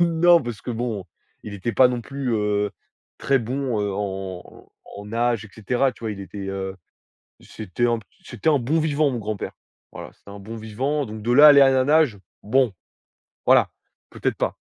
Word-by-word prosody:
Non, 170 Hz, 0 st, +5 dB
parce 120 Hz, -4 st, -6 dB
que, -, -, -5 dB
bon, 115 Hz, -4 st, -3 dB, 0.4 s
il 105 Hz, -, -8 dB
était 100 Hz, +4 st, -3 dB
pas 130 Hz, -, +6 dB
non 125 Hz, -1 st, -2 dB
plus, 135 Hz, +1 st, -4 dB
heu, 105 Hz, -1 st, 0 dB, 0.5 s
très 135 Hz, -1 st, +2 dB
bon, 125 Hz, -1 st, -2 dB
heu, 100 Hz, -1 st, -1 dB
en 95 Hz, -2 st, -6 dB, 0.3 s
en 100 Hz, -, -8 dB
nage 115 Hz, +1 st, -1 dB
et -, -, -12 dB
cetera, 125 Hz, +5 st, 0 dB
tu -, -, -21 dB
vois? 110 Hz, -, -2 dB
Il 100 Hz, -, -9 dB
était, 100 Hz, 0 st, -7 dB
heu, 95 Hz, -1 st, -4 dB, 0.7 s
c'était 110 Hz, +3 st, -3 dB
un 120 Hz, -1 st, +1 dB
p 110 Hz, -, -15 dB, 0.2 s
c'était 160 Hz, -, -3 dB
un 145 Hz, -, +3 dB
bon 140 Hz, +7 st, 0 dB
vivant, 150 Hz, -1 st, +1 dB
mon 125 Hz, -, -3 dB
grand-père. 110 Hz, -2 st, -4 dB, 0.4 s
Voilà, -, -, -9 dB
c'était -, -, -17 dB
un 100 Hz, -, -9 dB
bon 110 Hz, +3 st, -8 dB
vivant. 130 Hz, +7 st, -2 dB
Donc 110 Hz, 0 st, -8 dB
de 120 Hz, +3 st, 0 dB
là 145 Hz, +4 st, +8 dB
à -, -, +11 dB
aller 140 Hz, -1 st, +7 dB
à 135 Hz, -1 st, +7 dB
la 130 Hz, -1 st, +2 dB
nage, 150 Hz, -5 st, +3 dB, 0.3 s
bon, 125 Hz, +2 st, +2 dB, 0.7 s
voilà, -, -, +5 dB, 0.4 s
peut-être -, -, -2 dB
pas. -, -, -1 dB
115 Hz, 200 wpm, -23 LUFS, 105-135 Hz, 0.7 s, à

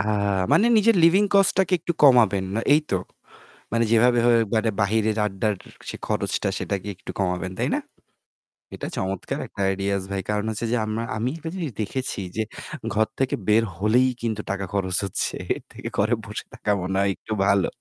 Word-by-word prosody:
আ -, -, +3 dB, 0.5 s
মানে 220 Hz, -, +5 dB
নিজের 220 Hz, +2 st, +5 dB
living 190 Hz, +5 st, +5 dB
cost 195 Hz, -1 st, +5 dB
টাকে 190 Hz, 0 st, +2 dB
একটু 170 Hz, -, -1 dB
কমাবেন 115 Hz, -9 st, +6 dB
বা 110 Hz, -, +1 dB
এই 150 Hz, -, +6 dB
তো। -, -, +1 dB, 0.8 s
মানে 115 Hz, 0 st, +2 dB
যেভাবে 120 Hz, +2 st, +5 dB, 0.6 s
বাইরে 110 Hz, +2 st, +2 dB, 0.2 s
আড্ডার 105 Hz, +1 st, -1 dB, 0.3 s
সে -, -, -4 dB
খরচটা -, -, -1 dB
সেটাকে 100 Hz, +1 st, -3 dB
একটু -, -, -9 dB
কমাবেন, 90 Hz, -1 st, -1 dB
তাই -, -, 0 dB
না? -, -, +1 dB, 1.0 s
এটা -, -, -5 dB
চমৎকার 95 Hz, 0 st, -3 dB
একটা -, -, -7 dB
ideas 100 Hz, 0 st, -1 dB
ভাই। 100 Hz, -1 st, -1 dB
কারণ 105 Hz, 0 st, 0 dB
হচ্ছে 110 Hz, +2 st, -3 dB
যে 120 Hz, -, +2 dB
আমরা 110 Hz, +1 st, -2 dB
আমি 115 Hz, +4 st, 0 dB
একটা 160 Hz, 0 st, -6 dB
জিনিস 165 Hz, -7 st, -3 dB
দেখেছি 130 Hz, +3 st, -3 dB, 0.2 s
যে -, -, +2 dB, 0.5 s
ঘর 110 Hz, +1 st, +2 dB
থেকে 135 Hz, -1 st, +1 dB
বের 110 Hz, +2 st, +5 dB
হলেই 115 Hz, +6 st, +3 dB
কিন্তু 110 Hz, -2 st, -2 dB
টাকা 100 Hz, 0 st, -2 dB
খরচ 95 Hz, -2 st, 0 dB
হচ্ছে। 95 Hz, -, -2 dB, 0.2 s
এর -, -, -10 dB
থেকে -, -, -7 dB
ঘরে 110 Hz, +4 st, +2 dB
বসে 105 Hz, 0 st, -6 dB
থাকা 105 Hz, -, -2 dB
মনে 95 Hz, +2 st, -2 dB
হয় 100 Hz, -, +2 dB
একটু 110 Hz, -, -6 dB
ভালো। 100 Hz, -1 st, +3 dB
110 Hz, 180 wpm, -24 LUFS, 100-125 Hz, 1.0 s, কমাবেন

